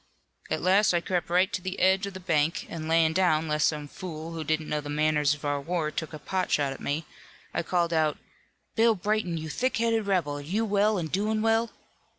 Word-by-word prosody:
"At - - -2
last 190 0 +4
I - - +4
crept 175 0 -2
right 180 +2 +2
to 185 - -2
the 185 +1 -4
edge 190 +2 +3
of 195 - -8
the - - -5
bank 160 -3 0
an' 160 -2 -5
layin' 160 0 +3
down 160 -3 +2
lest 150 0 +2
some 150 -2 -2
fool 165 -1 -7
who 165 -1 -4
didn't 155 0 -1
know 150 0 -1
the 145 - -8
manners 150 -1 +2
of 145 - -10
our 145 -1 0
war 160 0 -1
take 160 0 -4
a 155 - -6
pot 185 +5 -2
shot 140 -2 +1
at - - -11
me, 150 +3 -2 0.5
I - - 0
called 170 0 0
out, 155 -2 +2 0.6
'Bill 225 0 +4
Brayton, 205 -3 -1
you 160 0 -5
thick 255 - -1
headed 225 -2 +1
rebel, 165 -7 0
are - - -7
you 195 +10 -1
well 205 0 +2
an' 175 - -2
doin' 215 +6 0
well?' 225 +1 +2
170 Hz, 225 wpm, -27 LUFS, 155-195 Hz, 0.6 s, last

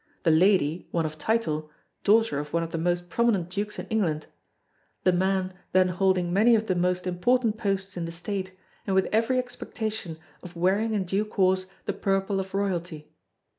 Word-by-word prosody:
The 165 - +4
lady, 170 -1 +3
one 165 -2 0
of 155 0 -5
title, 155 -9 0 0.3
daughter 220 -7 +3
of 150 0 -6
one 170 0 +1
of 165 - -6
the 165 - -2
most 175 +1 0
prominent 195 -4 +1
Dukes 210 +2 -3
in - - -5
England, 175 -9 0 0.8
the 185 - +5
man 190 +1 0 0.2
then 185 0 +4
holding 180 -1 +1
many 225 +5 +5
of 220 0 +1
the 190 - +1
most 180 +1 0
important 220 +5 +1
posts 195 -3 -2
in 175 -2 -3
the 165 - -5
State, 185 +2 -4 0.4
and 195 - +1
with 190 - +4
every 230 +4 +2
expectation 220 -7 -4 0.2
of 175 -1 -11
wearing 200 +6 +1
in 200 - +1
due 195 +3 0
course 190 -3 +1 0.2
the - - -1
purple 195 0 0
of 190 0 -5
royalty. 175 -6 -3
190 Hz, 180 wpm, -26 LUFS, 175-210 Hz, 0.8 s, the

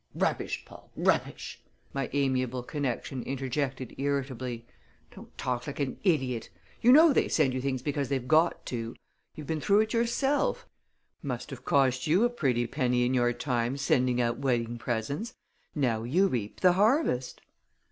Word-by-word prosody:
"Rubbish, - - -1
Paul! - - -15
Rubbish!" - - -1 0.3
my 135 -2 -2
amiable 130 -3 0
connection 135 -2 -3
interjected 135 0 -3
irritably. 130 -4 -2 0.5
"Don't - - -14
talk 125 0 -2
like 140 - -6
an 140 -2 -2
idiot! 130 - 0 0.3
You 245 - +6
know 310 +3 +8
they - - +2
send 140 -5 +2
you 130 - -2
things 130 -2 -2
because 140 -2 -2
they've 130 -3 -2
got 160 +2 +3
to. 115 -2 -4 0.4
You've 150 - -8
been 155 +1 -2
through 205 +4 +4
it 220 0 -2
yourself. 270 - +1 0.6
Must 135 -1 -5
have 130 - -9
cost 130 -1 +2
you 175 +8 +4
a 240 - +3
pretty 125 - 0
penny 125 -2 +1
in 125 - 0
your 120 -1 +3
time 120 0 -1
sending 125 -2 +2
out 120 0 0
wedding 120 -3 -1
presents! 125 - -3 0.4
Now 125 -7 +1
you 155 +12 +2
reap 115 - -3
the 180 -1 +6
harvest." 205 - +1
135 Hz, 155 wpm, -29 LUFS, 125-155 Hz, 0.6 s, know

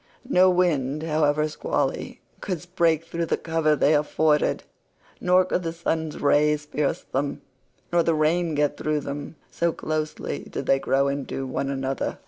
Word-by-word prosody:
No 185 -7 +5
wind, 155 -5 +1
however 150 -1 +2
squally, 150 - -2 0.2
could 180 -4 -4
break 165 -1 +2
through 165 0 -3
the - - +1
cover 160 -2 +1
they 150 +1 +3
afforded, 150 0 +2 0.6
nor 180 +1 +4
could 185 - -1
the 165 -2 -3
sun's 160 -2 -2
rays 150 +1 +3
pierce 150 -1 -1
them, 140 +2 -3 0.5
nor 175 - +5
the 165 -1 +1
rain 160 +1 +1
get 145 0 +1
through 155 -1 -1
them, 145 +3 -6 0.2
so 170 0 +1
closely 155 -1 -3
did - - -6
they 135 - +3
grow 135 +1 +1
into 140 -1 -3
one 135 +1 -2
another. 135 0 -2
155 Hz, 155 wpm, -25 LUFS, 145-165 Hz, 0.6 s, No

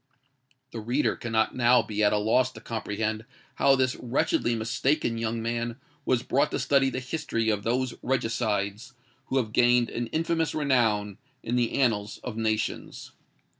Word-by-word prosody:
The 115 - -5
reader 120 +7 0
cannot 110 -2 0
now 125 0 +4
be 105 0 -2
at 105 - +4
a 105 - +2
loss 125 +5 +2
to 110 - -10
comprehend 110 -1 -3 0.4
how 135 -1 +6
this 130 -1 +1
wretchedly 120 -1 0
mistaken 120 +2 0
young 115 0 -2
man 115 0 -2 0.3
was 130 -1 +1
brought 140 +2 +1
to - - -2
study 135 -1 +3
the 130 - -3
history 125 -4 -2
of 105 -1 -1
those 125 +3 -1
regicides 115 -2 -1 0.3
who 135 - 0
have 110 -4 -1
gained 120 0 +4
an 120 0 -3
infamous 165 +3 -1
renown 110 -9 +1 0.2
in 120 - -2
the 120 -2 +1
annals 105 -6 0
of - - -5
nations. 110 -1 -2
120 Hz, 160 wpm, -27 LUFS, 110-130 Hz, 0.4 s, how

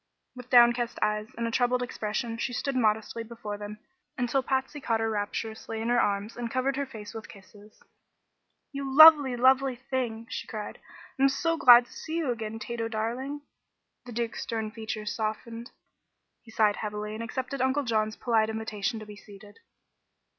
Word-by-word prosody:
With 250 0 -11
downcast 240 -1 +5
eyes 210 0 0
and 235 - -2
a 230 - -2
troubled 250 +1 +1
expression 225 -1 -3
she 245 - -2
stood 275 +2 -2
modestly 220 -1 0
before 220 -3 -7
them 210 0 -7 0.4
until 250 +1 +1
Patsy 265 +2 -2
caught 230 -3 0
her 225 0 0
rapturously 220 +1 -4
in 225 +1 -2
her 240 0 +4
arms 205 +2 -1
and 240 -1 -4
covered 260 +2 0
her 280 0 -2
face 215 -5 -9
with 220 -1 -8
kisses. 205 +2 -16 0.9
"You 275 -1 -4
lovely, 290 -3 +9
lovely 260 +1 +3
thing!" 250 -3 -3
she - - -6
cried. 210 -2 -6 0.4
"I'm 275 +1 +5
so 330 +5 0
glad 245 -6 +8
to - - -17
see 315 - -6
you 310 -7 0
again, 225 -2 -5
Tato 230 0 -4
darling!" 240 +6 -3 0.7
The - - -7
Duke's 235 0 -3
stern 220 -3 -3
features 220 -1 -5
softened. 230 +2 -4 0.7
He 235 - -18
sighed 215 -2 +2
heavily 210 0 -4
and 220 - -6
accepted 255 +3 -4
Uncle 265 +2 +1
John's 215 -3 0
polite 220 -3 +1
invitation 220 0 -3
to - - -8
be 210 0 -11
seated. 205 0 -15
230 Hz, 170 wpm, -28 LUFS, 215-255 Hz, 0.9 s, lovely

